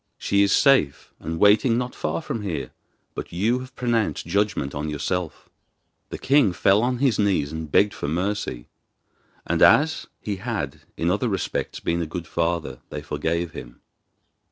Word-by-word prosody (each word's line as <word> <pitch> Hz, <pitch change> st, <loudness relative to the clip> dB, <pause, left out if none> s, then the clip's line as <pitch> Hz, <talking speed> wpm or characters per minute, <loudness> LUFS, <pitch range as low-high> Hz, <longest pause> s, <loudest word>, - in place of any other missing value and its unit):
She 100 Hz, -, +1 dB
is 100 Hz, -, +3 dB
safe, 130 Hz, -, +3 dB
and 80 Hz, 0 st, -4 dB
waiting 105 Hz, +5 st, +4 dB
not 125 Hz, 0 st, -2 dB
far 80 Hz, +2 st, -3 dB
from 115 Hz, -, -4 dB
here; 95 Hz, -6 st, -4 dB, 0.4 s
but -, -, -6 dB
you 110 Hz, +8 st, +1 dB
have 130 Hz, +1 st, -10 dB
pronounced 120 Hz, -3 st, 0 dB
judgment 100 Hz, -6 st, 0 dB
on 75 Hz, +1 st, -3 dB
yourself.' 80 Hz, +2 st, -3 dB
Then -, -, -35 dB, 0.6 s
the -, -, -5 dB
king 135 Hz, -8 st, +3 dB
fell 100 Hz, +4 st, +3 dB
on 125 Hz, +1 st, 0 dB
his 130 Hz, -4 st, +1 dB
knees 95 Hz, -9 st, +1 dB
and 80 Hz, -2 st, -6 dB
begged 100 Hz, 0 st, +4 dB
for -, -, -5 dB
mercy; 85 Hz, -6 st, -2 dB, 0.8 s
and -, -, -1 dB
as 155 Hz, +2 st, +5 dB
he 105 Hz, -2 st, -4 dB
had 95 Hz, -, -4 dB, 0.2 s
in 85 Hz, +1 st, +1 dB
other 110 Hz, +5 st, 0 dB
respects 95 Hz, -3 st, -3 dB
been 85 Hz, +1 st, -1 dB
a 85 Hz, -, -3 dB
good 85 Hz, +1 st, -5 dB
father, 85 Hz, 0 st, -2 dB
they -, -, -6 dB
forgave 85 Hz, +1 st, -2 dB
him. 80 Hz, -, -10 dB
95 Hz, 170 wpm, -24 LUFS, 80-115 Hz, 0.8 s, as